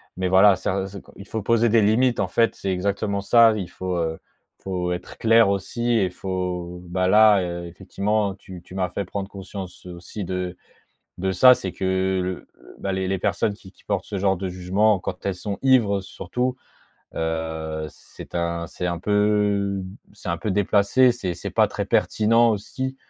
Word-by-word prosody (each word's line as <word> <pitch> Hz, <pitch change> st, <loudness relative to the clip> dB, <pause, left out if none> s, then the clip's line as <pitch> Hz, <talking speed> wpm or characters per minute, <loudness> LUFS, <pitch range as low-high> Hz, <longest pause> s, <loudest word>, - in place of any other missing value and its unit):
mais 95 Hz, 0 st, -1 dB
voilà, 95 Hz, +2 st, +6 dB
ça, 95 Hz, +1 st, -2 dB
c'est 100 Hz, 0 st, -9 dB
quand -, -, -19 dB
il 100 Hz, -, -11 dB
faut 110 Hz, -, -3 dB
poser 115 Hz, +3 st, +3 dB
des 115 Hz, 0 st, +4 dB
limites, 120 Hz, +4 st, +3 dB
en 90 Hz, -, -1 dB
fait, 115 Hz, +4 st, +2 dB
c'est 95 Hz, -, -3 dB
exactement 100 Hz, +2 st, -1 dB
ça. 115 Hz, +3 st, +6 dB
Il 95 Hz, -4 st, -4 dB
faut, 90 Hz, 0 st, -4 dB
heu, 80 Hz, -1 st, -1 dB, 0.4 s
il -, -, -30 dB
faut 90 Hz, -2 st, -2 dB
être 90 Hz, -, -8 dB
clair 115 Hz, -2 st, +5 dB
aussi 120 Hz, +5 st, -1 dB
et 95 Hz, -3 st, +2 dB
faut, 90 Hz, -1 st, -4 dB
bah, 90 Hz, +1 st, 0 dB
là, 105 Hz, -1 st, +6 dB
heu, 85 Hz, 0 st, -4 dB
effectivement, 100 Hz, +3 st, -1 dB
tu 95 Hz, -3 st, -11 dB
tu 90 Hz, -, -13 dB
m'as 95 Hz, -1 st, 0 dB
fait 100 Hz, -, -3 dB
prendre 95 Hz, +1 st, -5 dB
conscience 95 Hz, -2 st, -9 dB
aussi 90 Hz, +3 st, -7 dB
de 90 Hz, 0 st, -3 dB, 0.6 s
de 95 Hz, +1 st, -1 dB
ça. 125 Hz, +8 st, +7 dB
C'est 95 Hz, -6 st, -5 dB
que 95 Hz, 0 st, 0 dB
l -, -, -2 dB, 0.4 s
l -, -, -15 dB
bah, 100 Hz, -, -1 dB
les 95 Hz, 0 st, -1 dB
les 95 Hz, -, 0 dB
personnes 100 Hz, +3 st, 0 dB
qui-qui 100 Hz, -1 st, -17 dB
portent 100 Hz, -3 st, -1 dB
ce 100 Hz, -, -5 dB
genre 95 Hz, -1 st, +2 dB
de 95 Hz, 0 st, -4 dB
jugement 95 Hz, +3 st, +2 dB
quand 90 Hz, 0 st, -6 dB
elles 100 Hz, -2 st, -1 dB
sont 100 Hz, +2 st, -5 dB
ivres, 115 Hz, -7 st, +3 dB
surtout, 125 Hz, +6 st, -3 dB, 0.6 s
heu, 80 Hz, -1 st, -3 dB
c'est -, -, -13 dB
un 85 Hz, 0 st, -2 dB
c'est 90 Hz, -, -5 dB
un 85 Hz, -2 st, -2 dB
peu 105 Hz, -1 st, +1 dB, 0.3 s
c'est 100 Hz, -3 st, -8 dB
un 85 Hz, -, -1 dB
peu 105 Hz, -, -2 dB
déplacé. 105 Hz, +6 st, +3 dB
C'est 95 Hz, -7 st, -3 dB
c'est -, -, -6 dB
pas -, -, +3 dB
très -, -, -4 dB
pertinent 115 Hz, +2 st, +3 dB
aussi. 130 Hz, +6 st, -4 dB
95 Hz, 190 wpm, -23 LUFS, 90-105 Hz, 0.6 s, ça